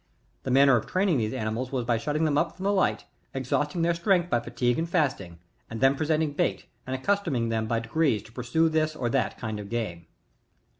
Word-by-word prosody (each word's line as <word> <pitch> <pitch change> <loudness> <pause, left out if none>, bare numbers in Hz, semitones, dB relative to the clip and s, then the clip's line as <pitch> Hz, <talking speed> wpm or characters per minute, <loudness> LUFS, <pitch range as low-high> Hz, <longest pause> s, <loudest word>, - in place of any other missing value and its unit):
The - - -5
manner 135 +1 +6
of 110 - -4
training 185 -6 +1
these 110 -1 -1
ani 110 0 -2
mals 125 +3 -3
was 125 -3 -2
by 120 -2 +1
shutting 150 +6 0
them 150 -2 +1
up 165 +3 0
from 190 - -7
the 200 +1 +2
light, 190 - +1 0.3
exhausting 145 +5 -1
their 170 +1 +3
strength 175 0 +1
by 120 - +3
fatigue, 120 +2 -1
and 165 +1 -2
fasting, 130 - -1 0.3
and 115 - -6
then 135 +2 +5
presenting 155 +1 0
bait, 100 -8 -1 0.2
find 130 0 -2
accustoming 155 - 0
them 110 -1 -1
by 115 0 0
degrees 120 -1 +1
to 110 - -16
pursue 125 +7 +1
this 155 -1 0
or 125 -5 -2
that 130 -2 0
kind 110 -3 -4
of 100 -1 -8
game. 95 -8 -4
135 Hz, 215 wpm, -27 LUFS, 115-160 Hz, 0.3 s, manner